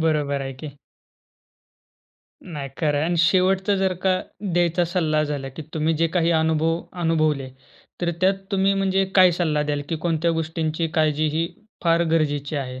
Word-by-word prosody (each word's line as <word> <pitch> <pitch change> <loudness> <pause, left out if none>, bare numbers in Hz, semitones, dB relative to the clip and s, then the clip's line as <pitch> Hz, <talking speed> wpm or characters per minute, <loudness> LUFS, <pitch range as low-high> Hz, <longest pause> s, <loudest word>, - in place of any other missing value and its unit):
बरोबर 150 -3 0
आहे 135 - -5
की. 145 +1 -9 1.7
नाही, 145 -5 -6
खरं 150 -2 +1
आहे 150 - +1
आणि 175 0 0
शेवटचा 190 +3 +3
जर 190 -1 +1
का 185 -1 +2 0.3
द्यायचा 175 0 +2
सल्ला 160 -3 0
झाला 145 -2 -4
की 160 - -5
तुम्ही 160 +1 +1
जे 165 +1 +2
काही 170 0 +3
अनुभव 160 +1 +1 0.2
अनुभवले, 155 -5 +1 0.5
तर 175 -1 0
त्यात 190 +1 +4 0.2
तुम्ही 195 0 +2
म्हणजे 195 0 +1
काय 185 -2 +7
सल्ला 150 -3 +1
द्याल 145 -1 -2
की 165 - -1
कोणत्या 165 0 +1
गोष्टींची 160 0 -2
काळजी 155 -1 +2
ही 165 +2 0 0.4
फार 170 0 +3
गरजेची 145 -2 0
आहे? 130 -2 -4
160 Hz, 160 wpm, -23 LUFS, 150-175 Hz, 1.7 s, काय